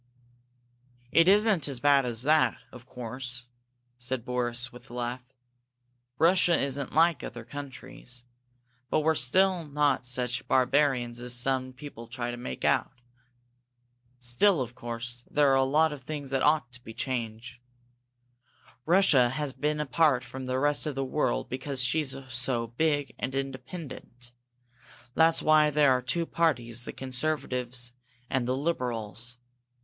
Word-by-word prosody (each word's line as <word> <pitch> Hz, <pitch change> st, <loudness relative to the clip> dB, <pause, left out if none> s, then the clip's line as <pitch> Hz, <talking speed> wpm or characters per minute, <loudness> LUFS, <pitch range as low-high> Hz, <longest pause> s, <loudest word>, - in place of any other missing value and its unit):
"It 165 Hz, +1 st, +5 dB
isn't 200 Hz, -5 st, +4 dB
as 135 Hz, -3 st, -3 dB
bad 140 Hz, -1 st, +4 dB
as 120 Hz, 0 st, -1 dB
that, 155 Hz, +2 st, +3 dB
of 125 Hz, 0 st, -13 dB
course," 125 Hz, 0 st, -6 dB, 0.5 s
said 125 Hz, -1 st, -3 dB
Boris, 125 Hz, -1 st, -2 dB
with 125 Hz, -, -14 dB
a 120 Hz, -, -9 dB
laugh. 120 Hz, +1 st, -3 dB, 1.0 s
"Russia 175 Hz, +2 st, +4 dB
isn't 140 Hz, -1 st, -2 dB
like 165 Hz, -1 st, +4 dB
other 120 Hz, -1 st, -7 dB
countries, 130 Hz, -2 st, -9 dB, 0.7 s
but -, -, +2 dB
we're 160 Hz, +1 st, +2 dB, 0.2 s
not 155 Hz, -8 st, +2 dB
such 125 Hz, 0 st, -2 dB
barbarians 130 Hz, -2 st, +2 dB
as 125 Hz, 0 st, +2 dB
some 130 Hz, +1 st, +1 dB
people 130 Hz, -3 st, -10 dB
try 120 Hz, 0 st, -4 dB
to -, -, -5 dB
make 65 Hz, -, -5 dB
out. -, -, +2 dB, 1.3 s
Still, 135 Hz, +10 st, +3 dB
of 120 Hz, -2 st, -3 dB
course, 120 Hz, 0 st, -6 dB
there 145 Hz, -2 st, +3 dB
are -, -, +4 dB
a -, -, +4 dB
lot 150 Hz, +3 st, +3 dB
of 145 Hz, -, -9 dB
things 140 Hz, 0 st, -6 dB
that 135 Hz, -1 st, 0 dB
ought 150 Hz, -5 st, +2 dB
to 125 Hz, 0 st, -10 dB
be 110 Hz, -, -10 dB
changed. 120 Hz, -1 st, -4 dB, 1.3 s
Russia 160 Hz, -9 st, +5 dB
has 135 Hz, +1 st, -3 dB
been 150 Hz, +1 st, -1 dB
apart 150 Hz, -2 st, +2 dB
from 130 Hz, 0 st, -8 dB
the 130 Hz, 0 st, -1 dB
rest 145 Hz, +2 st, +1 dB
of 150 Hz, -, -3 dB
the 135 Hz, 0 st, -1 dB
world -, -, -1 dB
because 130 Hz, 0 st, -1 dB
she's 135 Hz, +1 st, +1 dB
so 120 Hz, -1 st, +1 dB
big 145 Hz, +4 st, -1 dB
and 130 Hz, +1 st, -3 dB
independent. 130 Hz, -2 st, -7 dB, 0.8 s
That's 165 Hz, +2 st, +4 dB
why 155 Hz, -1 st, +5 dB
there 150 Hz, -2 st, +4 dB
are 125 Hz, -1 st, +2 dB
two 165 Hz, +7 st, 0 dB
parties, 120 Hz, -9 st, 0 dB
the -, -, -5 dB
conservatives 125 Hz, -2 st, -2 dB, 0.4 s
and 130 Hz, -2 st, 0 dB
the 130 Hz, +1 st, 0 dB
liberals. 120 Hz, -5 st, -3 dB
130 Hz, 145 wpm, -28 LUFS, 120-150 Hz, 1.3 s, It